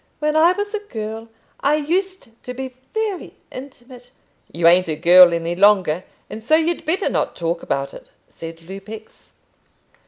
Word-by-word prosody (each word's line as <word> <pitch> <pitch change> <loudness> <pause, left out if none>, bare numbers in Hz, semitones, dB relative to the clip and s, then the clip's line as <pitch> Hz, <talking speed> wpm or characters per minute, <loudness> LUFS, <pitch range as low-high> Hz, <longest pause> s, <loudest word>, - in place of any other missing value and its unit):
"When 300 0 -1
I 330 +3 +5
was 410 +2 -4
a 425 - -1
girl, 225 - -7 0.3
I 285 +2 +2
used 370 +3 -2 0.2
to 250 - -6
be 260 0 -6 0.2
very 435 -4 -3 0.2
intimate 255 -2 -12 0.2
" - - -33
"You 165 0 +2
ain't 180 +1 +5
a 155 - -2
girl 175 +2 +7
any 170 0 -2
longer, 185 -4 +3 0.2
and 220 - -9
so 310 +7 +4
you'd 330 +1 0
better 365 +5 0
not - - -1
talk 170 0 -2
about 140 0 -3
it," - - -13 0.2
said 165 0 -10
Lupex. 195 +5 -11
225 Hz, 165 wpm, -20 LUFS, -, 0.3 s, girl